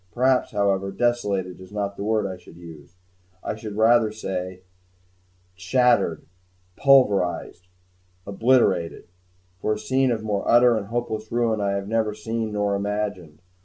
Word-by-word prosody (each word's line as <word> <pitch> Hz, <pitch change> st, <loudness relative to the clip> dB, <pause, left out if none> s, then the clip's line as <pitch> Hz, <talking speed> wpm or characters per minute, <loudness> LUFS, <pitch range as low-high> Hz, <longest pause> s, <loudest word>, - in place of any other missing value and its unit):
Perhaps, 130 Hz, +1 st, +2 dB
however, 100 Hz, -2 st, 0 dB
"desolated" 100 Hz, -5 st, -1 dB
is 95 Hz, -, -13 dB
not 100 Hz, -1 st, -3 dB
the 100 Hz, -, -6 dB
word 110 Hz, -1 st, 0 dB
I 95 Hz, -1 st, -4 dB
should 90 Hz, -2 st, -16 dB
use; 85 Hz, -1 st, -13 dB, 0.5 s
I -, -, -3 dB
should 110 Hz, -1 st, -7 dB
say, -, -, -8 dB
rather, 110 Hz, -5 st, +1 dB, 0.9 s
"shattered, 95 Hz, -2 st, +1 dB, 0.5 s
pulverized, 100 Hz, -9 st, +2 dB, 0.6 s
obliterated," 100 Hz, -6 st, +1 dB, 0.5 s
for 110 Hz, -, 0 dB
a -, -, -4 dB
scene 130 Hz, +4 st, +1 dB
of 110 Hz, -2 st, -2 dB
more 105 Hz, -2 st, -2 dB
utter 120 Hz, 0 st, +6 dB
and 105 Hz, -3 st, -3 dB
hopeless 110 Hz, -1 st, -4 dB
ruin 115 Hz, -3 st, 0 dB
I 100 Hz, -1 st, 0 dB
have 100 Hz, 0 st, -3 dB
never 110 Hz, -1 st, 0 dB
seen 110 Hz, 0 st, -4 dB
nor 105 Hz, -1 st, 0 dB
imagined. 100 Hz, -5 st, -4 dB
105 Hz, 140 wpm, -23 LUFS, 95-115 Hz, 0.9 s, utter